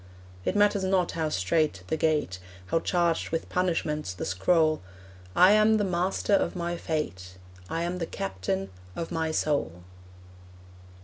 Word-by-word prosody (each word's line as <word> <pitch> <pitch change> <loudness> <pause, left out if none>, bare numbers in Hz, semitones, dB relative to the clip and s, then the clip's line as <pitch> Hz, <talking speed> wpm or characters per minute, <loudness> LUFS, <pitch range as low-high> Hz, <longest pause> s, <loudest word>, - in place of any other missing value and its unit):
It - - 0
matters 205 -1 +3
not 190 -2 +2
how 160 -2 -1
strait 155 - 0
the 160 - +1
gate, 150 - 0 0.3
How 165 - +1
charged 170 -1 +1
with 165 - -3
punishments 155 - -1
the - - -4
scroll, 155 - +2 0.5
I 185 +2 +7
am 215 +1 +5
the 210 - +1
master 185 +2 0
of 200 - +2
my 175 -1 -2
fate: 95 - -4 0.3
I 165 - -1
am 175 +1 -2
the 165 - -2
captain 95 0 -3 0.2
of 165 - -4
my 160 -1 -1
soul. 140 - -1
165 Hz, 145 wpm, -27 LUFS, 145-180 Hz, 0.5 s, I